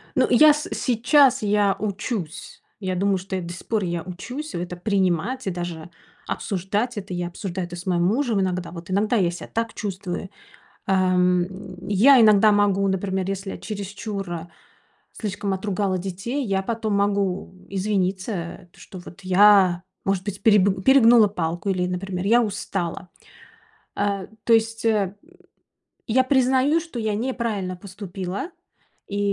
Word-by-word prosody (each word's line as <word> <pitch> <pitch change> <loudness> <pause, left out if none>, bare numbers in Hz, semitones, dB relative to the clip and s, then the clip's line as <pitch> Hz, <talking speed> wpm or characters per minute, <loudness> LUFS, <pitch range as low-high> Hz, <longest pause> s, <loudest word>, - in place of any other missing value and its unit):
Ну, - - +4
я 300 +5 +7
с 300 +1 -4
сейчас 255 +1 +3
я 205 -1 +2
учусь. 200 -4 -4 0.2
Я 185 -2 -2
думаю, 195 +1 +2
что 190 +1 -5
я, 185 - -3
до 170 0 -6
сих 175 - -10
пор 215 -4 0
я 170 -1 -2
учусь 245 - -7
это 175 0 -4
принимать, 190 +4 0
и - - +1
даже 175 -1 -6 0.4
обсуждать 205 +5 -2
это. 190 -2 -6
Я 175 0 -2
обсуждаю 180 0 -5
это 175 0 -8
с 175 - -9
моим 175 -1 +1
мужем 225 0 +1
иногда. 185 -1 -2
Вот 170 +1 -9
иногда 210 +5 +1
я 180 -4 +2
ся 175 - -8
так 230 -1 -3
чувствую, 190 -2 -5 0.6
ам. 180 -2 +3 0.4
Я 240 +7 +6
иногда 215 -1 +6
могу, 200 -1 +2
например, 190 0 -1
если 195 0 -4
я - - -6
чересчур 200 -4 -5 0.7
слишком 205 -2 -3
отругала 190 -1 -1
детей, 195 +9 -4
я 195 -2 0
потом 220 -1 -2
могу 200 -2 0 0.2
извиниться, 190 -2 -2
что 185 - -11
вот 175 +2 -13
я, 185 -1 +5 0.2
может 195 -1 0
быть, 200 -1 -5
переб 200 -3 +4
перегнула 235 -5 +7
палку 175 0 -3
или, 180 -1 0
например, 180 0 -4
я 235 +3 +5
устала. 185 -4 -4 0.9
Э, 200 -2 -1 0.2
то 230 - +2
есть, 225 0 +2
э, 205 -4 +1 0.9
я 260 +3 +3
признаю, 265 +4 +3
что 325 -7 -8
я 215 -2 -1
неправильно 220 -6 -2
поступила, 195 - -6 0.6
и 200 0 -3
195 Hz, 145 wpm, -23 LUFS, 185-220 Hz, 0.9 s, я